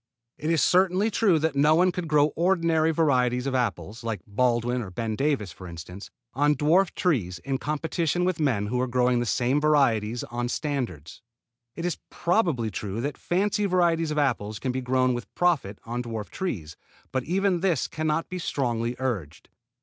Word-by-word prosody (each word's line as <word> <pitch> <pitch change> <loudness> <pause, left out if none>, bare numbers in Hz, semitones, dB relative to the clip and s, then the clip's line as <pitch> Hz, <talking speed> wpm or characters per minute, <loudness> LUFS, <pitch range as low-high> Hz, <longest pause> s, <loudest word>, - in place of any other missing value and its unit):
It 155 - -2
is 165 -2 +3
certainly 185 +4 +3
true 195 -6 +3
that 155 -1 0
no 150 +3 +4
one 180 +2 +4
could 175 -1 -4
grow 150 -1 +3
ordinary 165 -2 +2
varieties 125 -6 +2
of 135 - -1
apples, 110 -3 -2
like 110 -5 -3
Baldwin 120 +3 +1
or 100 - -6
Ben 110 +4 -3
Davis 135 - 0
for 90 - -11
instance, 90 +3 -9 0.2
on 145 +3 +3
dwarf 165 +7 +2
trees 110 - 0
in 135 -1 -1
competition 160 +3 -1
with 180 -3 0
men 125 -10 +1
who 125 +4 -1
are 130 - 0
growing 125 0 +2
the 120 - -1
same 130 +6 +1
varieties 120 -7 +2
on 120 0 -3
standards. 125 - -4 0.5
It 170 - -4
is 175 - -2
probably 170 - 0
true 100 +2 -4
that 145 +3 -3
fancy 205 +3 0
varieties 170 -3 +2
of 150 - -3
apples 110 -7 0
can 130 - -2
be 130 +1 -3
grown 130 0 +2
with 120 0 -6
profit 150 - +1
on 120 +2 -3
dwarf 115 -3 -6
trees, 85 - -4 0.4
but 130 - 0
even 190 +1 +1
this 175 -6 +1
can 155 0 -3
not 155 +2 0
be 185 -1 -5
strongly 120 -6 -1
urged. 105 - -4
135 Hz, 180 wpm, -26 LUFS, 115-165 Hz, 0.5 s, no